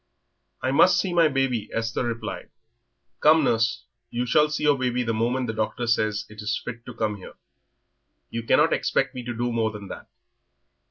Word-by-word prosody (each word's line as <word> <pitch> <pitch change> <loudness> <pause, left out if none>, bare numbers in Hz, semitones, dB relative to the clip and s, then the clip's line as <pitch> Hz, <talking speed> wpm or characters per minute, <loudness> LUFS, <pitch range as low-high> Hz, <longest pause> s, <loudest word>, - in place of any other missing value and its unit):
"I 130 - +1
must 175 +5 +5
see 185 -1 -1
my 170 -2 +5
baby," 135 -6 -1
Esther 115 +2 -2
replied. 115 -1 -5 0.7
"Come, 155 +1 +5
nurse, 115 -1 +1 0.2
you 120 +1 -2
shall 150 +5 +3
see 150 0 -3
your 150 -1 +4
baby 125 -2 -1
the 115 -1 -1
moment 120 +3 0
the 110 - -3
doctor 110 +2 -2
says 110 -3 0
it 105 +1 -11
is 105 +1 -1
fit 115 -2 -7
to 125 - -8
come 110 -2 -1
here. 95 - -12 1.0
You 115 - -3
can't 115 - +3
expect - - 0
me 125 - -5
to 120 0 -4
do 120 0 -1
more 115 -1 +1
than 105 -2 -9
that." - - -9
120 Hz, 185 wpm, -25 LUFS, 110-130 Hz, 1.0 s, must